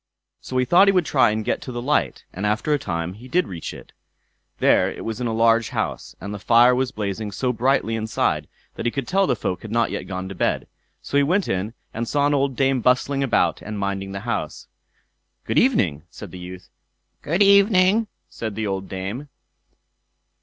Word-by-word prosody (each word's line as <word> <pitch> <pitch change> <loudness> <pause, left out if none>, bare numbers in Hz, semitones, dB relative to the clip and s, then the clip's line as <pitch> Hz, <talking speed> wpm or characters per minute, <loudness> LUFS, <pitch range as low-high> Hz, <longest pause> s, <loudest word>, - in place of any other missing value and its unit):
So 130 - -5
he 125 - +2
thought 175 +9 +6
he - - +7
would 180 -3 +2
try - - +4
and 110 0 -2
get - - -1
to 130 - -7
the 120 - -4
light; 140 +5 0
and 95 - -6
after 105 +8 +1
a 145 - +1
time 85 -5 -3
he 115 +6 -12
did 180 +8 +1
reach 85 -4 -6
it. - - -12 0.7
There - - +3
it - - -8
was 115 +2 -4
in 120 - 0
a - - -1
large 115 0 +3
house, 105 - -4
and 100 +4 -6
the 105 - -6
fire 120 +4 +5
was 130 0 0
blazing 105 -1 -4
so 125 +5 -1
brightly 120 -1 +1
inside, 110 0 -1 0.3
that - - -3
he - - +1
could 135 -2 -4
tell 195 0 +2
the - - +2
folk 90 -4 -3
had 110 - -8
not 115 0 +1
yet - - -5
gone 95 0 -4
to 95 - -6
bed; 90 - -1 0.4
so 140 - -1
he - - +5
went 180 +8 +1
in 95 +5 -2 0.2
and 115 +1 -3
saw 145 +3 +1
an 145 - +2
old 140 -2 +1
dame 135 -1 +2
bustling 125 +3 +2
about 135 - +1
and 105 0 -6
minding 100 -1 -3
the 100 0 -5
house. 115 -10 -4 0.8
"Good - - +2
evening!" 95 - +2
said - - -10
the 90 - -9
youth. 90 0 -10 0.5
"Good 175 +7 +2
evening!" 200 +1 +5 0.2
said 110 -3 -6
the 110 - -2
old 95 -1 -3
dame. 100 +10 -5
115 Hz, 210 wpm, -22 LUFS, 100-140 Hz, 0.8 s, he